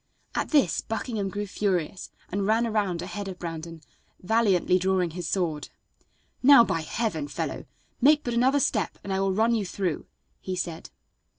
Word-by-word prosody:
At - - -1
this 275 - +3
Buckingham 220 -3 -3
grew 205 +2 -3
furious 190 -3 -2 0.2
and 195 +1 -1
ran 225 +2 +3
around 200 -6 -1
ahead 200 +2 -5
of 185 -2 -6
Brandon, 165 -1 -6 0.4
valiantly 190 -3 +2
drawing 185 -2 +1
his 170 -1 -5
sword. 165 -6 -1 0.7
"Now, 270 -2 +8
by 165 -7 -1
heaven! 160 -3 -2
fellow, - - -4 0.4
make 295 +3 +5
but 240 - -2
another 260 +4 +3
step 215 - 0
and 200 - -3
I 190 - 0
will 195 0 +1
run 220 +4 +2
you 220 -3 +1
through," 185 -3 -3 0.3
he 185 - -4
said. 170 -2 -5
195 Hz, 165 wpm, -26 LUFS, 175-225 Hz, 0.7 s, Now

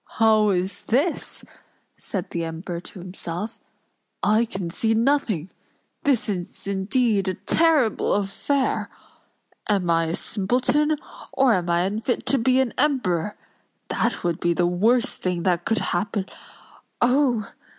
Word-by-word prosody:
"How 220 -1 +5
is 185 0 -2
this?" 285 +9 -1 0.5
said 190 -4 -5
the 170 - -2
Emperor 165 +2 -5
to 180 - -11
himself. 180 +3 -5 0.6
"I 215 +3 +4
can 190 -6 -5
see 225 +5 +1
nothing! 225 - +1 0.5
This 275 -5 +2
is 180 -4 -5
indeed 200 +1 +1
a 185 - 0
terrible 310 - +2
affair! 235 +7 -1 0.8
Am 190 -5 +2
I 165 0 +3
a 165 +1 -2
simpleton, 255 +9 +1 0.4
or 265 -3 +4
am 175 -3 0
I 170 0 +3
unfit 215 +6 -1
to 275 - +3
be 255 +2 +3
an 260 -3 +1
Emperor? 210 - +1 0.5
That - - -1
would 170 -2 -1
be 170 0 +1
the 175 - +2
worst 225 +9 +1
thing 180 -2 -1
that 175 -1 +1
could 225 - +1 0.2
happen—Oh! 220 +5 -2
205 Hz, 130 wpm, -24 LUFS, 180-245 Hz, 0.8 s, How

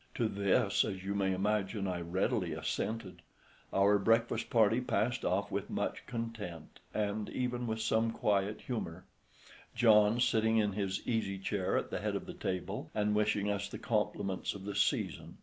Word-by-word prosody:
To 115 - +1
this, 100 -2 +2
as 95 -1 -4
you 100 +1 -2
may 100 -1 +1
imagine, 100 +1 0
I 90 -1 -2
readily 90 +3 0
assented. 105 -6 -3 0.5
Our 100 +1 +4
breakfast 115 +3 +2
party 115 +1 +4
passed 125 0 0
off 100 +2 0
with 100 - -2
much - - -3
content, 110 -9 -6
and 105 0 -1
even 125 -1 -2
with 110 0 -2
some 110 +1 +2
quiet 105 -1 0
humour, 90 -8 -4 0.7
John 110 0 +5
sitting 110 -2 +3
in 105 -2 +2
his 95 -2 -2
easy 110 -5 0
chair 95 0 -1
at - - -2
the - - -2
head - - -1
of - - -3
the - - -7
table 95 +2 -3
and 105 0 +1
wishing 105 -1 +1
us 100 0 -2
the - - -6
compliments 95 0 -1
of 95 -1 -8
the 100 - -3
season. - - 0
105 Hz, 165 wpm, -33 LUFS, 95-110 Hz, 0.7 s, John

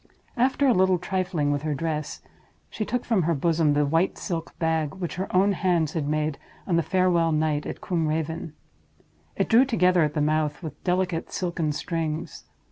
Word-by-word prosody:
After 260 +3 +2
a 255 - +5
little 185 -2 +3
trifling 180 -4 -1
with 145 -1 -1
her 155 -1 -2
dress, 155 0 -3 0.5
she 215 - -3
took 245 +2 -2
from 225 -6 +2
her 165 0 +1
bosom 160 0 +2
the 145 0 +2
white 165 +6 +1
silk 165 -4 -5
bag 160 -2 0
which 180 -3 -4
her 190 - -2
own 195 +2 +4
hands 175 -5 +1
had 155 -4 -2
made 155 -1 -1 0.3
on 175 - 0
the 170 - +3
farewell 175 -2 +2
night 155 -1 0
at - - -6
Combe 165 -4 -1
Raven. 160 0 -3 0.8
It - - 0
drew 235 +3 +6
together 185 -9 +3
at 150 -1 0
the - - 0
mouth 155 +1 0
with 150 -2 -8
delicate 180 -2 -1
silken 170 -4 -1
strings. 160 0 -4
165 Hz, 185 wpm, -25 LUFS, 155-185 Hz, 0.8 s, drew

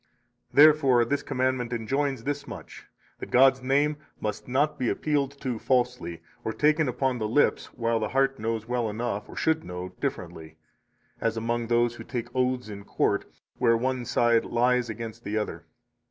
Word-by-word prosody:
Therefore 140 -5 +6
this 140 +4 0
commandment 130 -2 -1
enjoins 135 +2 -1
this 145 +1 -3
much, - - -10 0.3
that - - -7
God's 130 +1 +5
name 145 +3 +2 0.2
must 105 0 -4
not 140 +4 +1
be 125 - +1
appealed 140 -2 -1
to 125 -5 -2
falsely, 125 -10 0 0.2
or 110 - -2
taken 150 +1 +2
upon 130 0 -1
the 110 - -1
lips, 130 +7 +2
while 115 -1 0
the 110 - -2
heart 135 -1 +1
knows 110 0 -2
well 120 -2 0
enough, 105 -1 -3
or - - -10
should 160 0 +1
know, 90 +1 -6
differently; 80 0 -5 0.6
as 115 0 -1
among 115 +1 -1
those 120 0 +2
who - - -8
take 120 -2 -5
oaths 125 -2 0
in 100 -1 -8
court, - - 0 0.3
where 115 0 +4
one 130 +1 -1
side 120 -1 +3
lies 125 0 +1
against 115 +1 -6
the 105 +2 -2
other. 105 - -4
120 Hz, 170 wpm, -27 LUFS, 115-135 Hz, 0.6 s, Therefore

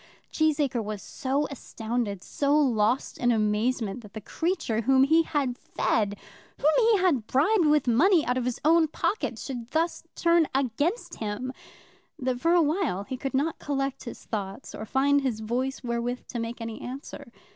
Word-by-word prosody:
Cheesacre 290 -6 +1
was 210 -1 -4
so 275 +8 -2
astounded, 225 -6 -4
so 285 +1 +1
lost 245 -4 +1
in 245 -1 +3
amazement 220 +1 0
that 210 -3 -14
the 220 - -5
creature 245 - -1
whom 265 +3 +4
he 320 +4 +5
had 280 -6 -1
fed, 205 -2 0 0.4
whom 295 - +3
he 455 -2 +5
had 320 - +1
bribed 330 - +3
with 300 -3 +3
money 315 - +4
out 250 - +1
of 255 -1 -1
his 250 -1 -2
own 325 0 +5
pocket, 405 +7 -2
should 245 -4 -6
thus 330 +3 0
turn 335 -2 +3
against 280 - -1
him, 225 +4 -3 0.6
that 255 -1 -2
for 335 +1 +3
a 345 - +5
while 300 - 0
he 260 +5 -5
could 270 +1 -4
not 295 +5 0
collect 275 -2 -2
his 235 - -8
thoughts 200 +2 -5
or 215 - -7
find 280 +4 +3 0.2
voice 255 +5 -2
wherewith 240 +1 -2
to 240 - -4
make 230 +1 -5
any 225 -1 -6
answer. 265 +4 -8
260 Hz, 170 wpm, -27 LUFS, 230-300 Hz, 0.6 s, he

